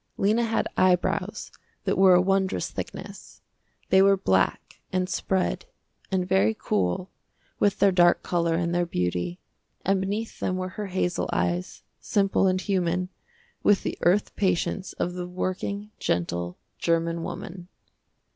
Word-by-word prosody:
Lena 215 Hz, +4 st, +2 dB
had 225 Hz, 0 st, 0 dB
eyebrows 180 Hz, -1 st, +1 dB, 0.3 s
that -, -, 0 dB
were 190 Hz, -1 st, +6 dB
a 180 Hz, -, +5 dB
wondrous 195 Hz, 0 st, 0 dB
thickness. -, -, -8 dB, 0.5 s
They 190 Hz, -, +6 dB
were 195 Hz, 0 st, +5 dB
black, 95 Hz, -, 0 dB
and 185 Hz, 0 st, 0 dB
spread, 190 Hz, -, -1 dB, 0.4 s
and 185 Hz, -1 st, 0 dB
very 105 Hz, -, +2 dB
cool, 100 Hz, -, -1 dB, 0.5 s
with 205 Hz, -, +2 dB
their 200 Hz, -, +4 dB
dark 175 Hz, -1 st, +4 dB
color 170 Hz, -2 st, +1 dB
and 170 Hz, 0 st, 0 dB
their 175 Hz, 0 st, +1 dB
beauty, 90 Hz, -, -2 dB, 0.5 s
and 195 Hz, 0 st, +2 dB
beneath 210 Hz, +4 st, -3 dB
them 185 Hz, -, -1 dB
were 185 Hz, 0 st, -3 dB
her 205 Hz, +2 st, -5 dB
hazel 180 Hz, -1 st, -1 dB
eyes, 85 Hz, +1 st, -1 dB, 0.2 s
simple 195 Hz, -1 st, +2 dB
and 185 Hz, 0 st, +2 dB
human, 180 Hz, -1 st, 0 dB, 0.5 s
with 205 Hz, -1 st, +3 dB
the -, -, -2 dB
earth 185 Hz, +4 st, +2 dB
patience 190 Hz, 0 st, 0 dB
of 175 Hz, -, -2 dB
the 180 Hz, 0 st, -5 dB
working, 185 Hz, +3 st, -3 dB
gentle, 85 Hz, 0 st, -2 dB, 0.2 s
german 165 Hz, 0 st, 0 dB
woman. 175 Hz, +1 st, -7 dB
180 Hz, 140 wpm, -26 LUFS, 170-195 Hz, 0.5 s, were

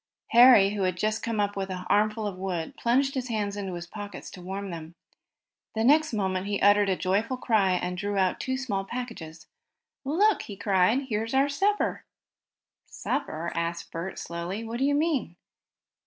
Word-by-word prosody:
Harry, 235 Hz, -5 st, +7 dB
who 205 Hz, -1 st, -3 dB
had 185 Hz, -1 st, 0 dB
just 215 Hz, +3 st, 0 dB
come 230 Hz, -2 st, -2 dB
up 205 Hz, 0 st, 0 dB
with 195 Hz, -1 st, -3 dB
an 185 Hz, -1 st, -5 dB
armful 215 Hz, +1 st, +2 dB
of 200 Hz, -3 st, -3 dB
wood, 180 Hz, -3 st, -4 dB
plunged 270 Hz, +4 st, +1 dB
his 260 Hz, -3 st, -3 dB
hands 210 Hz, -4 st, -2 dB
into 195 Hz, -3 st, -4 dB
his 175 Hz, 0 st, -6 dB
pockets 205 Hz, +3 st, -8 dB
to 180 Hz, -, -11 dB
warm 195 Hz, +2 st, -5 dB
them. 165 Hz, 0 st, -8 dB, 0.8 s
The 220 Hz, -, 0 dB
next 300 Hz, +5 st, +4 dB
moment 190 Hz, -3 st, -1 dB
he 205 Hz, -1 st, -1 dB
uttered 205 Hz, 0 st, +5 dB
a 190 Hz, -, +2 dB
joyful 205 Hz, +8 st, 0 dB
cry, 210 Hz, -7 st, +2 dB
and 180 Hz, 0 st, -2 dB
drew 205 Hz, 0 st, -2 dB
out 185 Hz, -1 st, +1 dB
two 260 Hz, 0 st, -2 dB
small 210 Hz, -7 st, -2 dB
packages. 195 Hz, -9 st, -7 dB, 0.6 s
"Look!" 375 Hz, +10 st, +2 dB
he 200 Hz, -, -9 dB
cried. 195 Hz, +6 st, +2 dB
"Here's 225 Hz, +3 st, -2 dB
our 275 Hz, +2 st, +3 dB
supper!" 400 Hz, +8 st, 0 dB, 0.8 s
"Supper?" 165 Hz, +2 st, -3 dB
asked 170 Hz, 0 st, -3 dB
Bert, 170 Hz, +3 st, -5 dB
slowly. 170 Hz, +6 st, -5 dB
"What 230 Hz, +1 st, -5 dB
do 270 Hz, -, +2 dB
you 285 Hz, 0 st, +2 dB
mean?" 290 Hz, -, 0 dB
205 Hz, 180 wpm, -27 LUFS, 185-235 Hz, 0.8 s, Harry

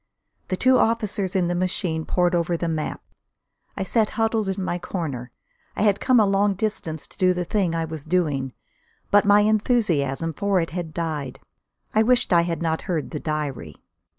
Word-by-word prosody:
The 185 Hz, -, -2 dB
two 255 Hz, +4 st, +4 dB
officers 210 Hz, -4 st, 0 dB
in 180 Hz, -2 st, +2 dB
the 175 Hz, -, 0 dB
machine 175 Hz, -2 st, -1 dB
pored 180 Hz, 0 st, +1 dB
over 170 Hz, 0 st, +1 dB
the 170 Hz, -, -2 dB
map; 160 Hz, -2 st, -3 dB, 0.7 s
I 195 Hz, -, -1 dB
sat 215 Hz, +2 st, +2 dB
huddled 225 Hz, -2 st, +1 dB
in 190 Hz, 0 st, -2 dB
my 175 Hz, -1 st, -2 dB
corner. 140 Hz, -10 st, -4 dB, 0.5 s
I -, -, 0 dB
had 205 Hz, -2 st, +3 dB
come 255 Hz, -2 st, +4 dB
a 215 Hz, -, +5 dB
long 200 Hz, 0 st, +2 dB
distance 185 Hz, -7 st, -3 dB
to -, -, -17 dB
do 185 Hz, -1 st, +3 dB
the 180 Hz, 0 st, -2 dB
thing 185 Hz, -3 st, 0 dB
I 165 Hz, 0 st, -1 dB
was 160 Hz, -2 st, -6 dB
doing. 150 Hz, -6 st, 0 dB, 0.6 s
But 205 Hz, +1 st, +5 dB
my 205 Hz, 0 st, +6 dB
enthusiasm 190 Hz, -, +1 dB
for 200 Hz, +3 st, +1 dB
it 165 Hz, -, -2 dB
had 170 Hz, -2 st, -4 dB
died. 155 Hz, -5 st, -4 dB, 0.5 s
I 215 Hz, -, +4 dB
wished 245 Hz, -2 st, +3 dB
I 170 Hz, -, +6 dB
had 170 Hz, 0 st, -2 dB
not 160 Hz, -1 st, 0 dB
heard 165 Hz, -4 st, -2 dB
the 150 Hz, -, -4 dB
diary. 145 Hz, -, -4 dB
180 Hz, 185 wpm, -23 LUFS, 160-205 Hz, 0.7 s, my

